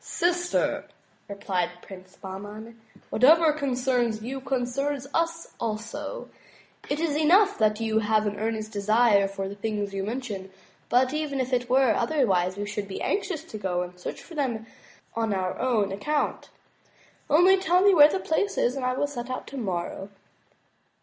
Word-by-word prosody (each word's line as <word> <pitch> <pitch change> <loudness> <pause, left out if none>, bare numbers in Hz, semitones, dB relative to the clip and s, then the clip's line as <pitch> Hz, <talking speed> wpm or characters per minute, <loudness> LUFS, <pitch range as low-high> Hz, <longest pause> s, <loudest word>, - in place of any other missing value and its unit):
"Sister," 350 0 0 0.4
replied 190 -3 -1
Prince 185 -1 -12
Bahman, 210 +4 -9 0.3
"whatever 310 +6 +5
concerns 250 -6 0
you, 265 +3 -5
concerns 270 +1 -2
us 335 0 -1
also. 230 - -4 0.6
It 285 - -1
is 320 -3 0
enough 370 +7 +4
that 215 -1 +2
you 220 -1 +1
have 215 0 +2
an 205 -1 -2
earnest 220 0 -2
desire 210 0 +3
for 195 0 -4
the 195 - -6
things 205 -1 -3
you 195 0 -2
mention; 210 -4 -5 0.4
but 255 +2 +3
even 300 -3 -2
if 260 0 -2
it 245 -1 0
were 260 -3 +4
otherwise, 200 - +1
we 205 - -3
should 205 -1 -4
be 195 - -6
anxious 375 -6 -1
to 225 -10 -8
go 180 -3 -1
and 180 0 -10
search - - -6
for 345 - -13
them 250 -7 -2 0.5
on 225 -3 0
our 185 -1 -2
own 225 -6 +1
account. 290 +10 -2 0.8
Only 355 +6 +6
tell 360 -1 +3
me 400 0 +6
where 295 -3 +8
the 385 - -1
place 395 +4 -1
is 245 - +2
and 270 - -4
I 255 0 +1
will 290 - +1
set 255 -4 -6
out 255 - -4
tomorrow." 195 -6 -4
240 Hz, 165 wpm, -26 LUFS, 205-290 Hz, 0.8 s, where